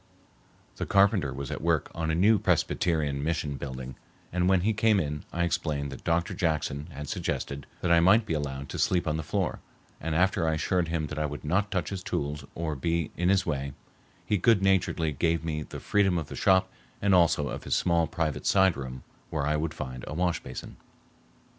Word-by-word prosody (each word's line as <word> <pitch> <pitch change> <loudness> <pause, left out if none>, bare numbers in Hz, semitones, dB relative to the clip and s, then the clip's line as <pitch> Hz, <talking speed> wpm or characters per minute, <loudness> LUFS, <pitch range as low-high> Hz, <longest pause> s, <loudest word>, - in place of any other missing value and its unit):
The - - -3
carpenter 100 -7 +3
was 70 0 -5
at - - -4
work 80 -2 +1
on 80 -1 -2
a 80 - +1
new 105 +5 +5
Presbyterian 75 -7 +1
mission 80 -2 -1
building, 65 -1 -6 0.4
and 90 0 +2
when 95 -2 +4
he 110 +4 +2
came 110 -1 +3
in 75 -3 -3
I 85 - 0
explained 75 -4 -1
that - - -9
Dr. 85 0 0
Jackson 75 -4 -1
had 75 -3 -7
suggested 70 0 -3
that 90 - +1
I 85 - +7
might 100 +6 +5
be 85 - -2
allowed 70 -2 -3
to - - -5
sleep 90 -2 +2
on 75 0 0
the - - -2
floor, 75 - -2 0.4
and 80 -1 -2
after 90 0 +2
I 80 - +2
assured 85 +2 0
him 80 -1 -1
that 75 +1 -5
I 75 - +1
would 75 +1 -7
not 100 +7 +1
touch 95 -4 -2
his 95 -2 -4
tools 75 -3 -3
or 80 -2 -2
be 85 +2 -1
in 90 +1 +1
his 95 0 +3
way, 70 -3 -2 0.5
he 105 - +1
goodnaturedly 95 - +2
gave 80 -2 +1
me 75 -2 -2
the - - -7
freedom 95 -3 +2
of 80 - -4
the - - -6
shop 95 -1 +3 0.3
and 100 -1 +2
also 80 -5 +4
of - - -6
his - - +1
small 85 -2 +2
private 80 -3 -2
side 95 -2 +4
room 65 -2 -7 0.3
where 75 -3 -1
I 75 +1 +1
would 80 +1 -2
find 65 -3 -6
a 75 - -5
wash 90 0 +1
basin. 65 - -8
80 Hz, 205 wpm, -28 LUFS, 75-90 Hz, 0.5 s, I